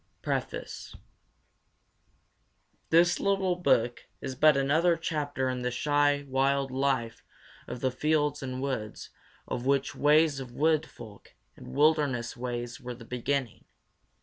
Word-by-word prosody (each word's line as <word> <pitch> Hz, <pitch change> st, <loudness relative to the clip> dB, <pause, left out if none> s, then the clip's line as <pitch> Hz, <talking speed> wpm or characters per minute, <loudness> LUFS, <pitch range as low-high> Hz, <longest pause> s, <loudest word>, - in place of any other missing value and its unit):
PREFACE -, -, -4 dB, 1.9 s
This 175 Hz, +2 st, +4 dB
little 195 Hz, -2 st, +1 dB
book 120 Hz, -9 st, +1 dB
is 135 Hz, -, -5 dB
but 150 Hz, +2 st, +5 dB
another 160 Hz, +5 st, +3 dB
chapter 145 Hz, -5 st, -2 dB
in 130 Hz, -1 st, -2 dB
the 125 Hz, -, -1 dB
shy 145 Hz, +2 st, +1 dB
'wild 135 Hz, 0 st, +1 dB
life 130 Hz, -3 st, -1 dB, 0.4 s
of 125 Hz, -, -6 dB
the 130 Hz, -, +1 dB
fields 150 Hz, +2 st, 0 dB
and 130 Hz, 0 st, -4 dB
woods' 115 Hz, -6 st, -4 dB, 0.4 s
of 125 Hz, +2 st, -4 dB
which 140 Hz, 0 st, +1 dB
"Ways 150 Hz, -1 st, +3 dB
of 130 Hz, -2 st, -7 dB
Wood 155 Hz, +3 st, +2 dB
Folk" 110 Hz, -4 st, -14 dB, 0.2 s
and -, -, -13 dB
"Wilderness 145 Hz, -5 st, +2 dB
Ways" 120 Hz, +1 st, -5 dB
were 125 Hz, -1 st, -6 dB
the 115 Hz, -1 st, -13 dB
beginning. 125 Hz, 0 st, -3 dB
135 Hz, 125 wpm, -28 LUFS, 125-150 Hz, 1.9 s, but